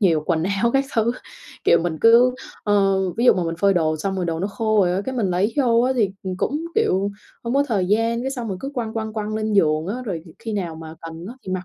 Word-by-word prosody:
nhiều 165 -7 +3
quần 165 -2 +1
áo 200 +5 +1
các 270 0 +2
thứ, 230 0 +2 0.5
kiểu, - - +5
mình 165 -3 -2
cứ, 240 +2 +6 0.3
ơ, 195 -2 +3 0.2
ví 235 - +1
dụ - - +8
mà 180 - -1
mình 165 0 -2
phơi 200 -1 +4
đồ 155 -2 +1
xong 190 +5 -3
rồi 180 - -1
đồ 165 -1 -2
nó 195 - 0
khô 215 0 +1
rồi 175 - +1
á, - - 0
cái 260 - -3
mình 205 -7 0
lấy 190 +5 0
vô 235 -4 +3
á 255 +2 +2
thì, 205 -5 +2
ừm, 185 -1 -4
cũng, 295 - -2
kiểu, 200 - +1 0.3
không 235 +2 -2
có 280 +1 +3
thời 200 -6 +1
gian, 225 +4 +1
cái 265 - -2
xong 245 -4 -4
mình 190 - -4
cứ 275 - -4
quăng, 225 -3 -3
quăng, 220 -1 -3
quăng 215 0 -3
lên 215 0 -1
giường 155 -5 +2
á, 240 +6 -4
rồi 180 -8 -4
dịp 165 - -13
khi 225 -1 -5
nào 175 -5 -3
mà 160 0 -9
cần 165 +1 -8
á 240 - -8
thì 185 - -5
mặc 185 0 -3
205 Hz, 280 wpm, -22 LUFS, 180-235 Hz, 0.5 s, dụ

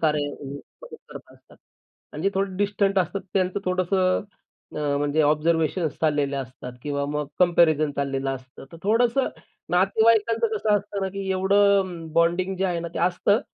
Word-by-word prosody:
कार्यामध्ये 145 -2 -1 0.3
मदत 485 -2 -10
करत - - -11
असतात. - - -21 0.6
आणि 150 - -6
जे 195 - +3
थोडे 195 -1 -1
डिस्टंट 200 0 +1
असतात, 185 +2 -1
त्यांचं 185 +1 0
थोडंसं 185 0 +1 0.5
अ, 145 -1 0
म्हणजे 145 +2 +1
ऑब्झर्वेशन्स 160 +2 +1
चाललेले 145 -3 +1
असतात 130 -1 -7
किंवा 140 -1 -2
मग 150 0 -2
कंपॅरिझन 165 -4 +4
चाललेलं 135 -1 -1
असतं. 130 -1 -8
तर - - -9
थोडंसं 235 +5 +2 0.4
नातेवाईकांचं 220 +5 +3
कसं 215 0 -1
असतं 205 0 -5
ना, 190 - 0
की 195 0 -5
एवढं 200 +1 +4
म 170 -3 -8
बॉन्डिंग 175 +3 +1
जे 190 - -1
आहे 175 -3 -1
ना, 170 - -5
ते - - -3
असतं. 185 +5 +2
180 Hz, 160 wpm, -24 LUFS, 150-195 Hz, 0.6 s, कंपॅरिझन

